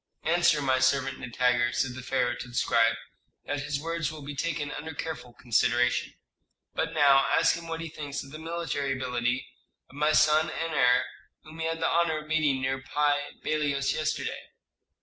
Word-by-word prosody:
"Answer 165 -2 +3
my 130 -1 +2
servant 135 0 +1
Nitager," 125 -1 +1
said 130 -2 0
the 130 - -7
pharaoh 125 -1 0
to - - -7
the 120 - -11
scribe, 115 -1 +3 0.5
"that 145 - -2
his 145 0 -2
words 165 -1 -2
will 155 -2 -9
be 145 +1 -6
taken 145 -1 -2
under 155 +1 -6
careful 155 -7 -5
consideration. 125 +1 +1 0.6
But 165 0 -2
now 140 -2 +5
ask - - +4
him 170 0 -8
what 165 0 -4
he 165 - -5
thinks 145 -2 -5
of 135 - -13
the 155 - -8
military 160 -4 -2
ability 125 -1 -1 0.5
of - - -16
my 150 +1 +2
son 155 +1 +4
and 165 0 -3
heir, 125 -3 +4 0.4
whom 155 +1 -12
he 160 - -1
had 165 0 -3
the - - +2
honor 165 -2 +2
of 155 0 -7
meeting 150 -4 +1
near 135 0 -1
Pi 145 +1 0
Bailos 145 -3 0
yesterday." 155 0 -2
145 Hz, 185 wpm, -28 LUFS, 130-155 Hz, 0.6 s, now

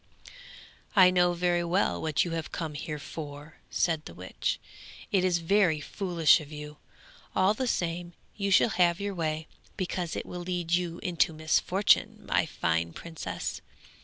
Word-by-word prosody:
'I 185 -2 +8
know 175 -1 +3
very 175 0 +1
well 175 +4 +1
what 155 +1 +1
you 170 - -4
have 165 -1 -4
come 160 -3 -4
here 150 +1 -5
for,' 150 0 -8
said 160 -3 0
the - - -10
witch. - - -3 0.5
'It 195 -4 +3
is 180 -2 +3
very 170 -2 +3
foolish 170 0 +3
of 150 0 -11
you! 150 0 -8 0.6
all 190 +2 +4
the 255 +4 -2
same 175 -4 -2 0.2
you 200 -1 -1
shall 195 - +5
have 175 -3 +2
your 200 0 -2
way, 160 -2 -2 0.3
because 180 -3 -2
it - - -4
will 180 - -6
lead 175 -1 -2
you 175 -1 +1
into 170 -3 +1
misfortune, 175 +5 +2
my - - +1
fine 85 0 -1
princess. 95 - -5
170 Hz, 160 wpm, -29 LUFS, 155-180 Hz, 0.6 s, I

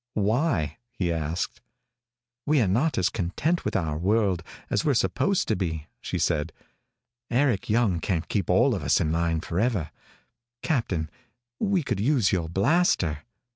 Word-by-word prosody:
"Why?" 105 - +1
he 95 -8 -2
asked. 80 +1 -3 0.9
"We're 145 -8 +3
not 125 - +1
as 90 - +3
content 115 - -1
with - - -2
our 80 -4 -1
world 100 -1 +2 0.3
as 100 - 0
we're 145 -3 +2
supposed 115 - +1
to 110 - +2
be," 80 -6 -3 0.2
she - - -3
said. 75 +2 0 0.8
"Eric 125 -4 +1
Young 105 -6 +2
can't 85 -2 -2
keep 95 -2 -1
all - - +4
of - - -2
us - - +2
in 75 - 0
line 80 -1 0
forever. 90 - -1 0.7
Captain, 95 - 0 0.5
we 195 -5 +1
could 120 -7 -2
use 120 -2 +2
your 85 -4 -1
blaster. 95 - +1
95 Hz, 145 wpm, -26 LUFS, 85-120 Hz, 0.9 s, all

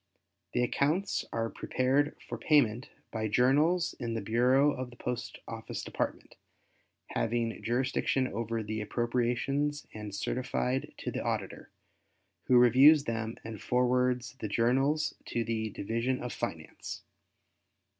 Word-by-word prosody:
The 125 - +2
accounts 155 +10 0
are 115 0 -1
prepared 135 +5 0
for 120 - -4
payment 125 -4 +3 0.2
by 110 -1 -1
journals 145 - +3
in 115 -3 -3
the 115 - -2
Bureau 125 +7 +4
of 130 -2 -5
the 120 - -14
Post 125 -1 -4
Office - - -6
Department - - -4 0.7
having 115 0 -1
jurisdiction 130 +2 +1
over 115 0 -3
the 110 +1 -3
appropriations 125 +6 0
and 105 -2 -6
certified 125 +4 -1
to - - -4
the - - -3
Auditor, - - -3 0.8
who 125 - +5
reviews 135 +5 +7
them 115 -1 -3
and 110 -3 -7
forwards 125 0 +1
the 110 - -3
journals 135 +8 +2
to 120 - -1
the 110 -1 -2
Division 115 +5 -1
of 125 - -4
Finance. - - -6
125 Hz, 125 wpm, -30 LUFS, 115-135 Hz, 0.8 s, reviews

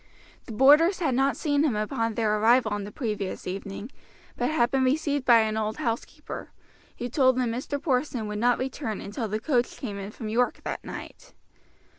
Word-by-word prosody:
The - - -7
boarders 295 - +6
had 305 -7 0
not 270 +2 +2
seen 290 -1 +1
him 280 -8 +1
upon 225 +1 -1
their 215 -1 +1
arrival 225 0 +4
on 205 -1 -3
the 205 - -8
previous 210 -5 -4
evening, 195 +5 -6 0.4
but - - 0
had 240 -6 +2
been 270 -1 +2
received 285 0 +1
by 235 -2 +7
an 220 0 -1
old 215 0 -2
housekeeper, 230 0 -4 0.5
who 245 - -3
told 260 0 +3
them 250 -2 +1
Mr. 260 +4 -3
Porson 255 -5 -1
would 210 0 -4
not 245 +2 +3
return 260 -4 -3
until 220 +3 -4
the 215 +1 -2
coach 245 0 0
came 205 -6 -5
in 195 0 -6
from 220 +1 -7
York 240 +3 0
that - - -4
night. - - -9
240 Hz, 190 wpm, -26 LUFS, 215-270 Hz, 0.5 s, by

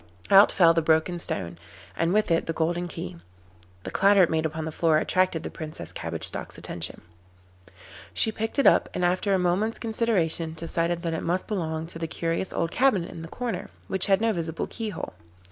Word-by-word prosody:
Out 195 +1 +8
fell 170 -3 +5
the 165 - +2
broken 160 +2 +2
stone, 85 - -4 0.4
and 165 +1 +1
with 210 -2 +2
it 165 - +2
the 165 - -1
golden 175 +2 -1
key. 90 - -7 0.7
The - - -6
clatter 200 0 +5
it 170 - +2
made 160 0 +1
upon 160 0 -5
the 160 - -4
floor 160 0 +2
attracted 185 0 +1
the - - -5
Princess 155 - -6
Cabbage 85 -2 -5
Stalk's - - -3
attention. 85 0 -5 1.1
She 220 - +1
picked 225 +3 -3
it 275 - +3
up, - - +5
and 180 - +1
after 185 +3 +2
a - - +3
moment's 185 +5 0
consideration 185 -8 0
decided 170 +1 -1
that 165 -1 -1
it 160 - -2
must 180 +2 -1
belong 160 -6 -2
to 165 0 -8
the 165 - -2
curious 165 +3 -2
old 165 0 -1
cabinet 245 -10 +2
in 165 - -8
the 165 - -7
corner, 225 -1 -4 0.2
which 190 -1 +2
had 195 +1 +3
no 225 -1 +2
visible 165 -2 -3
keyhole. 215 - -5
170 Hz, 195 wpm, -26 LUFS, 160-195 Hz, 1.1 s, Out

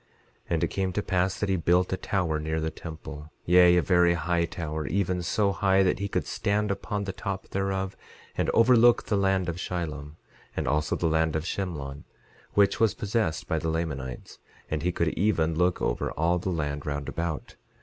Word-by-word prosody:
11:12 - - -37 0.4
And 85 -1 +1
it - - +3
came 95 -1 -1
to 105 - -1
pass 95 0 0
that 105 - 0
he 95 - +2
built 90 +2 +2
a - - +2
tower 90 -6 -1
near 80 +1 -2
the 80 0 -2
temple; 80 -2 -9
yea, 90 0 +6
a 90 - +3
very 90 -2 +4
high 85 +1 +1
tower, 80 -3 -4
even 90 0 0
so 100 +3 +1
high 95 -1 +3
that 95 0 +1
he 100 - -1
could - - -2
stand 105 0 0
upon 100 +1 -3
the 100 -1 -4
top 100 -1 -5
thereof 95 -1 -2 0.4
and - - 0
overlook 120 0 +5
the 105 - 0
land 95 -2 +2
of 85 -1 -3
Shilom, 75 -5 -4 0.4
and - - -1
also 75 +1 +1
the - - -2
land 80 -1 +2
of 80 0 -1
Shemlon, 75 -8 -4 0.5
which 100 -1 +4
was 110 -4 +3
possessed 105 -6 -1
by 80 -2 0
the 80 - -2
Lamanites; 70 -6 -4 0.3
and 80 -1 -1
he 90 +3 +1
could 85 -2 0
even 85 -5 +1
look 90 +2 +1
over - - 0
all 85 +3 +1
the 95 - -3
land 75 -4 -2
round 70 -1 -3
about. 85 -2 -4
90 Hz, 200 wpm, -27 LUFS, 80-95 Hz, 0.5 s, yea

